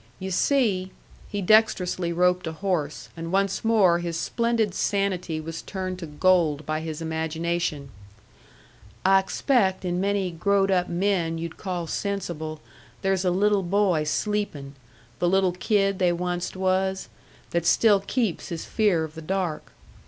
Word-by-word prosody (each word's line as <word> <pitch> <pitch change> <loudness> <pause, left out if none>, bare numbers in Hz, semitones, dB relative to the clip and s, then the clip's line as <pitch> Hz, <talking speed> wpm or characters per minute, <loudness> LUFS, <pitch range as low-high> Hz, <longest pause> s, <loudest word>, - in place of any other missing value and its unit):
You 190 0 -5
see" 195 -4 +1 0.4
he 205 -1 -3
dexterously 185 -4 +3
roped 180 0 +2
a 160 - -3
horse, 160 -4 -2
and 165 0 -6
once 195 0 +1
more 200 -7 +4
his 170 -1 -3
splendid 230 -1 0
sanity 185 -6 -1
was 165 +1 -6
turned 185 -2 -5
to 170 - -6
gold 155 -2 +2
by 155 +1 -1
his 160 0 -5
imagination 160 -2 -2 1.2
"I 195 0 +6
expect 190 -1 +1
in 180 0 -1
many 200 -2 0
growed 195 +3 +1
up 180 -1 +1
men 175 -2 0
you'd 165 0 -6
call 180 -3 -3
sensible 160 -5 -4 0.4
there's 195 -1 +1
a - - +4
little 200 +2 +2
boy 185 -3 +2
sleepin' 155 -6 -2 0.5
the 175 - +2
little 190 0 +3
kid 195 +1 +1
they 180 -2 +3
onced 175 +1 -3
was 190 0 0 0.4
that 170 -1 0
still 210 -3 +5
keeps 205 -1 -2
his 170 -1 -5
fear 200 -7 +2
of 155 -1 -6
the 160 - -8
dark. 180 -1 -3
180 Hz, 145 wpm, -25 LUFS, 165-195 Hz, 1.2 s, I